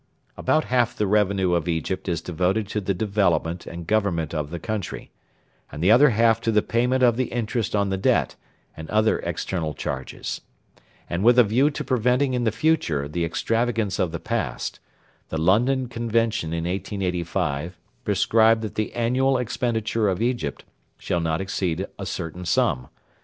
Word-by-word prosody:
About 155 0 +1
half 120 -2 +1
the 105 - 0
revenue 100 -3 +2
of 85 -2 0
Egypt 90 +3 -2
is 85 -2 -1
devoted 90 +5 0
to 105 - -2
the 100 0 -1
development 90 -4 0
and 85 0 -7
government 85 -7 0
of 75 -2 -2
the 85 - -5
country, 105 0 -5 0.6
and 75 - -5
the 95 - +5
other 135 +6 +7
half 115 -1 +3
to 115 - +1
the 105 -1 +3
payment 125 +3 +1
of 120 -2 +4
the 130 - +1
interest 115 -1 -2
on 100 -1 +1
the 95 -1 -1
debt - - +2 0.4
and 80 0 -9
other 110 +1 +2
external 80 -6 -3
charges; 65 - -5 0.7
and, 85 +3 -2
with 120 +2 +6
a 125 - +9
view 120 +7 +3
to 145 - -5
preventing 125 +2 +1
in 125 -1 0
the 110 - +2
future 105 - +1
the 85 +4 -2
extravagance 115 +4 0
of 90 - +1
the 85 - -4
past, - - -3 0.5
the 80 - -3
London 120 +10 +2
Convention 115 -6 -1
in 85 0 -2
1885 90 -3 -2 0.3
prescribed 110 +2 +3
that 110 - -4
the 110 - -2
annual 130 +3 +2
expenditure 115 -3 0
of 95 -1 -1
Egypt 120 - -2 0.3
shall 85 - -1
not 80 -1 -1
exceed 95 -2 -2
a 100 - -4
certain 85 +1 -5
sum. 65 -7 +1
105 Hz, 170 wpm, -24 LUFS, 85-115 Hz, 0.7 s, a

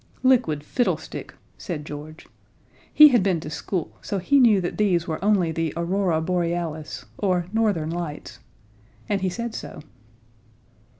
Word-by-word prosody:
"Liquid 235 - +3
fiddlestick!" 245 +10 -2 0.2
said 160 -7 -5
George. 150 +2 -9 0.7
He 300 0 +9
had 245 -5 +4
been 185 -3 +1
to 155 - -7
school, 170 +2 -3
so 200 - -3
he 275 +10 +3
knew 225 -6 +6
that 175 +2 -4
these 180 -5 +2
were 160 +2 -4
only 195 -5 +3
the 160 -1 -2
Aurora 175 -1 0
Borealis, 170 -2 -2
or 180 -4 +1
Northern 205 -9 +1
Lights. 170 -3 -6 0.7
And 200 -2 0
he 190 - +1
said 235 +5 -4
so. - - -8
175 Hz, 140 wpm, -24 LUFS, 160-205 Hz, 0.7 s, He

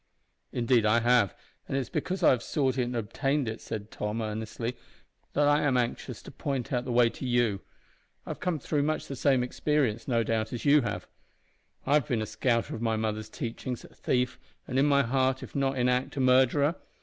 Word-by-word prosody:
"Indeed 120 -1 +2
I 110 +2 +4
have, 120 -4 +3 0.3
and 135 - -1
it - - +2
is 130 - -4
because 185 +1 -2
I - - +7
have 125 - +1
sought 135 0 0
it 125 - +2
and 120 0 -4
obtained 135 +5 -1
it," 110 +1 -4
said 110 -1 -6
Tom, 105 +2 -3
earnestly, 110 +2 -3 0.6
"that 145 0 +3
I 145 +1 +4
am 135 -3 +2
anxious 120 -1 -2
to - - -10
point 135 -3 -3
out 125 0 0
the 125 - -3
way 120 0 +5
to - - -9
you. 120 -6 +1 0.6
I've - - -6
come 180 -3 -1
through 150 +1 -1
much 155 +2 -1
the 135 - -6
same 130 -1 +2
experiences, 125 -3 0
no 120 -3 +2
doubt, 110 0 -1
as 120 - -5
you 145 +1 +6
have. 110 -5 -4 0.8
I 140 - +2
have 150 -4 +3
been 120 - 0
a - - -2
scouter 115 +2 0
of 115 - -5
my 115 -1 +1
mother's 110 -1 -2
teachings, 120 +2 -5
a - - -14
thief, 125 0 -1 0.3
and, 130 +1 0
in 145 +2 +4
heart 130 -1 +2
if - - -10
not 135 -1 +1
in 125 0 +2
act, 125 +3 0
a - - 0
murderer. 130 +5 +4
125 Hz, 210 wpm, -28 LUFS, 115-135 Hz, 0.8 s, I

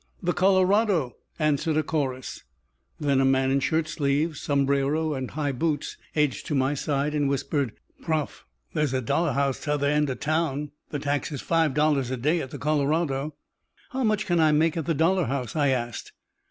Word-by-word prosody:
"The 175 0 +1
Colorado," 190 - +3 0.2
answered 155 0 +1
a 155 - +2
chorus. 135 -5 -3 0.6
Then 140 -3 +2
a - - +3
man 135 0 +3
in 135 - +3
shirtsleeves, 155 0 0
sombrero, 140 +2 +1
and 130 -2 -4
high 145 -2 -2
boots 145 +2 -2 0.2
edged 150 -8 0
to 150 - -1
my 135 +1 +2
side, 145 +1 -1
and 145 -2 +1
whispered, 140 -2 -1 0.3
"Prof, 155 -3 -2 0.3
there's 150 -3 0
a 130 - +1
dollar 160 +7 +1
house 140 -1 0
t'other 145 -1 0
end 150 0 +2
of 130 - -4
town. 150 -2 -1 0.2
The 150 - -3
tax 145 +1 -2
is 145 - -4
five 160 -5 +1
dollars 150 -4 +2
a 130 - -2
day 155 +7 +1
at 130 - -6
the - - -7
Colorado." 150 -1 0 0.6
"How 265 -1 -1
much 215 -1 +1
can 175 -4 +1
I 155 -1 +5
make 160 +2 +3
at 160 -4 -3
the 165 - +1
dollar 170 +3 +2
house?" 130 -3 -3
I 145 -2 +2
asked. 120 -4 -2
150 Hz, 180 wpm, -26 LUFS, 135-160 Hz, 0.6 s, I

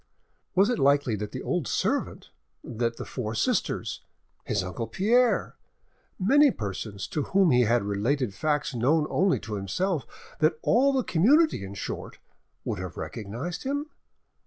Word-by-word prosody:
Was 200 +5 +4
it 245 - -1
likely 140 -4 +3
that 105 0 -5
the - - -6
old - - -1
servant, - - -1 0.3
that 115 0 -2
the - - -6
four 115 -3 -4
sisters, - - -1 0.4
his - - 0
uncle 95 +5 -4
Pierre, 235 +5 +2 0.6
many 280 +10 +5
persons 100 - -5
to 150 - -1
whom 190 +2 +3
he 125 -1 +4
had 120 0 +2
related 105 +4 -1
facts 150 +6 -1
known 145 +6 +2
only 190 -1 +2
to 110 0 -7
himself, 140 - -2 0.3
that 155 0 +3
all 265 +5 +4
the 265 -2 +1
community 270 - +3
in 100 +1 -7
short, 95 - -6 0.5
would 105 - -2
have 90 -2 -6
recognised 110 - -5
him? 285 +3 -3
140 Hz, 150 wpm, -27 LUFS, -, 0.6 s, many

